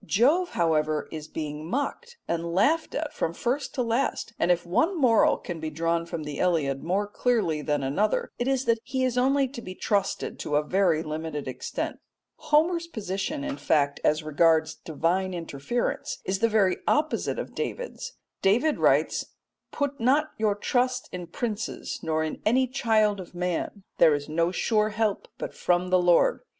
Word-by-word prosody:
Jove, 300 Hz, -, +2 dB
however, 155 Hz, -2 st, +1 dB
is 155 Hz, -1 st, -6 dB
being 155 Hz, 0 st, -5 dB
mocked 475 Hz, -, -3 dB
and 170 Hz, 0 st, -2 dB
laughed 315 Hz, -, +2 dB
at 310 Hz, 0 st, -3 dB
from 165 Hz, -, -2 dB
first 260 Hz, +4 st, -2 dB
to 250 Hz, -, +1 dB
last, 230 Hz, 0 st, -1 dB
and 170 Hz, -, +2 dB
if 175 Hz, -1 st, +2 dB
one 330 Hz, -, +1 dB
moral 240 Hz, -5 st, +4 dB
can 175 Hz, -2 st, -6 dB
be 160 Hz, 0 st, -3 dB
drawn 165 Hz, +2 st, -1 dB
from 165 Hz, -2 st, -4 dB
the 150 Hz, -1 st, -6 dB
Iliad 150 Hz, -7 st, +1 dB
more 190 Hz, +5 st, 0 dB
clearly 205 Hz, -7 st, 0 dB
than 145 Hz, -2 st, -1 dB
another, 185 Hz, +11 st, 0 dB
it 245 Hz, -, -1 dB
is 270 Hz, -1 st, +1 dB
that 230 Hz, -1 st, +2 dB
he 260 Hz, +1 st, -2 dB
is 255 Hz, -2 st, +1 dB
only 270 Hz, +2 st, +3 dB
to 250 Hz, -2 st, -8 dB
be 185 Hz, -4 st, -8 dB
trusted 200 Hz, -1 st, -1 dB
to 145 Hz, -, -2 dB
a 150 Hz, -, +3 dB
very 175 Hz, -2 st, +2 dB
limited 155 Hz, -2 st, -4 dB
extent. 130 Hz, -, -4 dB, 0.4 s
Homer's 335 Hz, +3 st, +2 dB
position, 220 Hz, -, -3 dB
in 290 Hz, -1 st, -3 dB
fact, 145 Hz, -2 st, +1 dB
as 155 Hz, +1 st, +2 dB
regards 160 Hz, +1 st, +3 dB
divine 180 Hz, +4 st, -1 dB
interference 165 Hz, -, -3 dB
is 190 Hz, 0 st, -1 dB
the 230 Hz, +2 st, +3 dB
very 200 Hz, -4 st, +3 dB
opposite 305 Hz, +1 st, +1 dB
of -, -, -5 dB
David's. -, -, -5 dB, 0.3 s
David 245 Hz, +11 st, +3 dB
writes, -, -, +2 dB, 0.5 s
"Put 285 Hz, -1 st, -2 dB
not 285 Hz, +6 st, +2 dB
your 215 Hz, -2 st, +1 dB
trust 250 Hz, +4 st, 0 dB
in 180 Hz, -1 st, -6 dB
princes 225 Hz, +1 st, -4 dB
nor 160 Hz, -1 st, 0 dB
in 155 Hz, -, -4 dB
any 255 Hz, +5 st, +3 dB
child 220 Hz, -5 st, +2 dB
of 180 Hz, -1 st, -10 dB
man; 180 Hz, +3 st, -2 dB, 0.2 s
there 160 Hz, -3 st, +6 dB
is 145 Hz, 0 st, -5 dB
no 165 Hz, +2 st, +1 dB
sure 215 Hz, +3 st, +1 dB
help 215 Hz, -1 st, -1 dB
but -, -, -5 dB
from 180 Hz, +1 st, 0 dB
the 185 Hz, -1 st, +5 dB
Lord." 175 Hz, -, +4 dB
195 Hz, 175 wpm, -26 LUFS, 165-250 Hz, 0.5 s, there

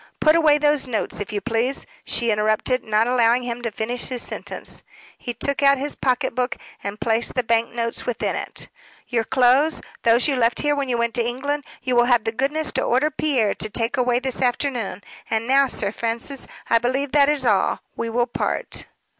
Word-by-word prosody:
"Put 310 Hz, +1 st, +5 dB
away 310 Hz, -3 st, +5 dB
those 295 Hz, -2 st, +2 dB
notes, 230 Hz, -4 st, -2 dB
if 205 Hz, -, -5 dB
you 205 Hz, -1 st, -2 dB
please," 245 Hz, +4 st, 0 dB, 0.2 s
she 235 Hz, -2 st, 0 dB
interrupted, 215 Hz, +4 st, +1 dB
not 215 Hz, +1 st, +2 dB
allowing 245 Hz, 0 st, +3 dB
him 240 Hz, 0 st, -4 dB
to 235 Hz, -, -2 dB
finish 230 Hz, +3 st, -3 dB
his 250 Hz, -2 st, -3 dB
sentence. -, -, -5 dB, 0.3 s
He 245 Hz, -, -5 dB
took 280 Hz, +4 st, -3 dB
out 280 Hz, 0 st, +5 dB
his 285 Hz, +2 st, -2 dB
pocket 260 Hz, 0 st, 0 dB
book 250 Hz, +1 st, -1 dB, 0.3 s
and 200 Hz, +1 st, -5 dB
placed 225 Hz, +1 st, 0 dB
the 250 Hz, -, +1 dB
bank 230 Hz, 0 st, +1 dB
notes 230 Hz, 0 st, -3 dB
within 245 Hz, -, -1 dB
it. -, -, -3 dB, 0.4 s
"Your 235 Hz, -2 st, +1 dB
clothes 265 Hz, +5 st, +3 dB, 0.2 s
those 235 Hz, +3 st, +4 dB
you 280 Hz, -, +1 dB
left 235 Hz, -1 st, +2 dB
here 295 Hz, -1 st, +2 dB
when 280 Hz, -2 st, -2 dB
you 240 Hz, -, +1 dB
went 235 Hz, 0 st, 0 dB
to 240 Hz, -, +1 dB
England 280 Hz, +5 st, -2 dB, 0.2 s
you 255 Hz, -1 st, 0 dB
will 240 Hz, 0 st, +5 dB
have 240 Hz, -3 st, +3 dB
the 225 Hz, -, 0 dB
goodness 280 Hz, +6 st, -1 dB
to -, -, -1 dB
order 270 Hz, +5 st, +2 dB
Pierre 265 Hz, -9 st, +1 dB
to 215 Hz, -, -3 dB
take 230 Hz, +2 st, -1 dB
away 250 Hz, -2 st, +2 dB
this 260 Hz, 0 st, -2 dB
afternoon. 245 Hz, -6 st, -1 dB, 0.3 s
And 225 Hz, 0 st, 0 dB
now, 275 Hz, +1 st, +4 dB
Sir 200 Hz, -5 st, 0 dB
Francis, 235 Hz, +5 st, -3 dB, 0.2 s
I 230 Hz, -, +4 dB
believe 260 Hz, +3 st, -1 dB
that 285 Hz, -1 st, +5 dB
is 290 Hz, -3 st, +1 dB
all: 205 Hz, -5 st, +2 dB
we 230 Hz, -, -3 dB
will 240 Hz, +1 st, +1 dB
part." 240 Hz, -, -3 dB
245 Hz, 205 wpm, -22 LUFS, 230-275 Hz, 0.4 s, Put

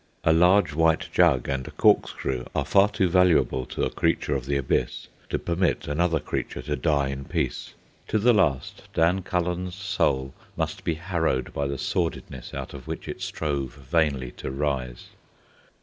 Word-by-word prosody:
A 80 Hz, -, +4 dB
large 90 Hz, 0 st, +4 dB
white 80 Hz, +1 st, +2 dB
jug 65 Hz, -2 st, +4 dB
and 65 Hz, -1 st, -2 dB
a -, -, -6 dB
corkscrew 65 Hz, -2 st, +1 dB
are -, -, 0 dB
far 100 Hz, +1 st, +4 dB
too 100 Hz, -3 st, +1 dB
valuable 85 Hz, -7 st, +3 dB
to -, -, -3 dB
a -, -, 0 dB
creature 75 Hz, -, 0 dB
of 65 Hz, -2 st, -3 dB
the 70 Hz, 0 st, +1 dB
Abyss 70 Hz, -, -1 dB, 0.2 s
to -, -, 0 dB
permit 85 Hz, +1 st, 0 dB
another 80 Hz, +2 st, +1 dB
creature 75 Hz, -, -4 dB
to 75 Hz, -, -2 dB
die 70 Hz, 0 st, +1 dB
in 70 Hz, 0 st, -5 dB
peace. 65 Hz, -, -3 dB, 0.3 s
To 110 Hz, -, +1 dB
the 120 Hz, +3 st, +4 dB
last, 75 Hz, -, +1 dB
Dan 85 Hz, +4 st, +3 dB
Cullen's 90 Hz, 0 st, -2 dB
soul 95 Hz, -9 st, 0 dB, 0.2 s
must -, -, -3 dB
be 80 Hz, -, 0 dB
harrowed 80 Hz, -6 st, -1 dB
by 70 Hz, 0 st, -1 dB
the 70 Hz, 0 st, -3 dB
sordidness 80 Hz, -5 st, -3 dB
out -, -, -6 dB
of -, -, -10 dB
which -, -, -5 dB
it -, -, -6 dB
strove 70 Hz, -5 st, -3 dB
vainly 70 Hz, -2 st, 0 dB
to -, -, -5 dB
rise. 65 Hz, -3 st, -3 dB
75 Hz, 170 wpm, -25 LUFS, 70-90 Hz, 0.3 s, A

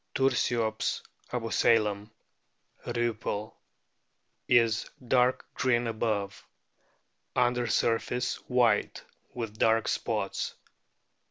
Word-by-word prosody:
Tursiops 120 Hz, -4 st, +1 dB, 0.3 s
abusalam, 110 Hz, -3 st, +1 dB, 0.8 s
Riippell,f 110 Hz, -2 st, -2 dB, 0.9 s
is 115 Hz, -3 st, +3 dB, 0.2 s
dark 125 Hz, +1 st, +3 dB
green 120 Hz, -2 st, +1 dB
above; 110 Hz, -3 st, -2 dB, 0.9 s
under 120 Hz, 0 st, +2 dB
surface 120 Hz, +2 st, 0 dB
white 125 Hz, -2 st, +2 dB, 0.3 s
with 110 Hz, -3 st, -5 dB
dark 115 Hz, 0 st, +3 dB
spots. -, -, -2 dB
115 Hz, 70 wpm, -29 LUFS, 110-125 Hz, 0.9 s, is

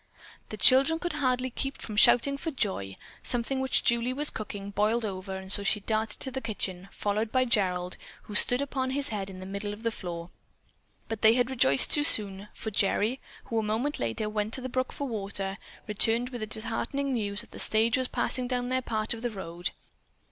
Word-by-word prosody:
The -, -, -6 dB
children 270 Hz, +5 st, +5 dB
could 345 Hz, 0 st, -3 dB
hardly 255 Hz, -3 st, 0 dB
keep 270 Hz, +2 st, -4 dB
from 215 Hz, -, -7 dB
shouting 245 Hz, +6 st, +6 dB
for 280 Hz, +4 st, -3 dB
joy. 190 Hz, -, -3 dB, 0.3 s
Something 245 Hz, +2 st, -2 dB
which 265 Hz, 0 st, +1 dB
Julie 235 Hz, +1 st, +2 dB
was 295 Hz, +3 st, +2 dB
cooking, 205 Hz, -2 st, -6 dB
boiled 215 Hz, +3 st, +1 dB
over 190 Hz, -1 st, -5 dB
and 190 Hz, 0 st, -5 dB
so 200 Hz, -, +6 dB
she 200 Hz, +1 st, +1 dB
darted 215 Hz, 0 st, -2 dB
to 265 Hz, -, -3 dB
the 265 Hz, +1 st, -4 dB
kitchen, 195 Hz, -4 st, -4 dB
followed 215 Hz, +2 st, -2 dB
by 255 Hz, -1 st, +3 dB
Gerald, 185 Hz, -6 st, +1 dB, 0.3 s
who 210 Hz, -, -10 dB
stood 245 Hz, +5 st, +3 dB
upon 265 Hz, -2 st, -2 dB
his 280 Hz, +2 st, -1 dB
head 200 Hz, -3 st, -4 dB
in 185 Hz, -1 st, -9 dB
the 185 Hz, -, -8 dB
middle 200 Hz, +2 st, -4 dB
of 210 Hz, +2 st, -11 dB
the 230 Hz, -, 0 dB
floor. 170 Hz, -4 st, -7 dB, 0.8 s
But 225 Hz, -1 st, -5 dB
they 220 Hz, +1 st, +6 dB
had 245 Hz, +1 st, +1 dB
rejoiced 140 Hz, -, +5 dB
too 295 Hz, -, +4 dB
soon, 200 Hz, -6 st, +2 dB
for 220 Hz, -, -6 dB
Gerry, 210 Hz, +5 st, +1 dB, 0.2 s
who 230 Hz, -, -2 dB
a -, -, +1 dB
moment 225 Hz, +7 st, -1 dB
later 120 Hz, -, -2 dB
went 210 Hz, +1 st, -2 dB
to 265 Hz, -, -4 dB
the 255 Hz, -, -5 dB
brook 255 Hz, +1 st, -1 dB
for 285 Hz, -, -4 dB
water, 200 Hz, -3 st, -3 dB, 0.3 s
returned 225 Hz, +3 st, +2 dB
with 245 Hz, -3 st, -7 dB
the 215 Hz, -, -3 dB
disheartening 230 Hz, +6 st, 0 dB
news 205 Hz, -4 st, -1 dB
that -, -, -13 dB
the -, -, -9 dB
stage 225 Hz, +2 st, +4 dB
was 255 Hz, 0 st, 0 dB
passing 255 Hz, 0 st, -2 dB
down 245 Hz, 0 st, -2 dB
their 260 Hz, 0 st, +1 dB
part 220 Hz, -2 st, -1 dB
of 225 Hz, -, -7 dB
the 240 Hz, -, -1 dB
road. 175 Hz, -4 st, -2 dB
220 Hz, 210 wpm, -28 LUFS, 200-255 Hz, 0.8 s, shouting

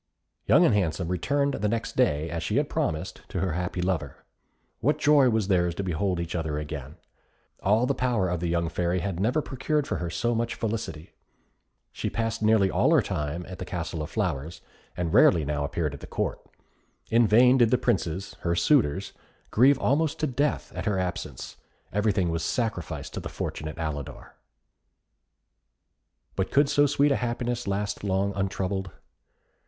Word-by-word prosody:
Young -, -, +6 dB
and -, -, +4 dB
Handsome 90 Hz, -3 st, 0 dB
returned 140 Hz, -, 0 dB
the 105 Hz, -5 st, -1 dB
next 115 Hz, +1 st, -2 dB
day, 80 Hz, -, +2 dB
as 85 Hz, -1 st, -3 dB
she 80 Hz, -, -2 dB
had -, -, +1 dB
promised, 80 Hz, +5 st, -2 dB
to 95 Hz, -, -3 dB
her 95 Hz, 0 st, 0 dB
happy 90 Hz, +2 st, -2 dB
lover. 90 Hz, -2 st, -3 dB, 0.5 s
What 150 Hz, +5 st, +2 dB
joy 145 Hz, -3 st, +5 dB
was 110 Hz, -4 st, +1 dB
theirs 90 Hz, -3 st, +2 dB
to 100 Hz, -, -3 dB
behold 90 Hz, +1 st, -1 dB
each 85 Hz, -1 st, -4 dB
other 80 Hz, -3 st, -2 dB
again! 75 Hz, -1 st, -6 dB, 0.7 s
All 110 Hz, +5 st, +3 dB
the 140 Hz, -, +1 dB
power 125 Hz, -7 st, 0 dB
of 90 Hz, -1 st, -1 dB
the 85 Hz, -, -2 dB
young 85 Hz, 0 st, 0 dB
Fairy 85 Hz, +2 st, -1 dB
had 95 Hz, -3 st, -3 dB
never 125 Hz, +10 st, +1 dB
procured 145 Hz, +3 st, -1 dB
for -, -, -2 dB
her 85 Hz, -, -3 dB
so 120 Hz, +7 st, 0 dB
much 115 Hz, +1 st, -1 dB
felicity. 110 Hz, -8 st, -4 dB, 0.8 s
She -, -, -3 dB
passed 115 Hz, 0 st, -2 dB
nearly 105 Hz, -3 st, +4 dB
all 115 Hz, -, +3 dB
her 135 Hz, -, +4 dB
time 85 Hz, -1 st, -3 dB
at 90 Hz, 0 st, -9 dB
the -, -, -3 dB
Castle 85 Hz, -2 st, -4 dB
of 75 Hz, -, -5 dB
Flowers, 85 Hz, -6 st, -3 dB, 0.4 s
and 85 Hz, -2 st, -2 dB
rarely 80 Hz, -4 st, +5 dB
now 75 Hz, 0 st, -1 dB
appeared 75 Hz, 0 st, -2 dB
at 70 Hz, -, -9 dB
Court. -, -, -2 dB, 0.7 s
In 115 Hz, 0 st, +5 dB
vain 125 Hz, +5 st, +6 dB
did 120 Hz, -2 st, +5 dB
the 125 Hz, -, +3 dB
princes, 95 Hz, -4 st, -1 dB
her 85 Hz, 0 st, 0 dB
suitors, 100 Hz, -, +2 dB, 0.4 s
grieve 130 Hz, +5 st, +5 dB
almost 150 Hz, +3 st, +1 dB
to -, -, +2 dB
death 140 Hz, +1 st, -1 dB
at -, -, -4 dB
her 100 Hz, -2 st, +1 dB
absence, 90 Hz, -1 st, -4 dB, 0.4 s
everything 100 Hz, -3 st, +1 dB
was 85 Hz, 0 st, -1 dB
sacrificed 80 Hz, -, -3 dB
to -, -, -3 dB
the -, -, -6 dB
fortunate 80 Hz, +2 st, -5 dB
Alidor. 75 Hz, -4 st, -5 dB, 2.0 s
But 95 Hz, -, -1 dB
could 140 Hz, 0 st, +3 dB
so 145 Hz, 0 st, +4 dB
sweet 145 Hz, +1 st, +3 dB
a -, -, +3 dB
happiness 120 Hz, -1 st, -2 dB
last 100 Hz, +1 st, -2 dB
long 100 Hz, 0 st, 0 dB
untroubled? 95 Hz, 0 st, -2 dB
95 Hz, 175 wpm, -26 LUFS, 85-120 Hz, 2.0 s, Young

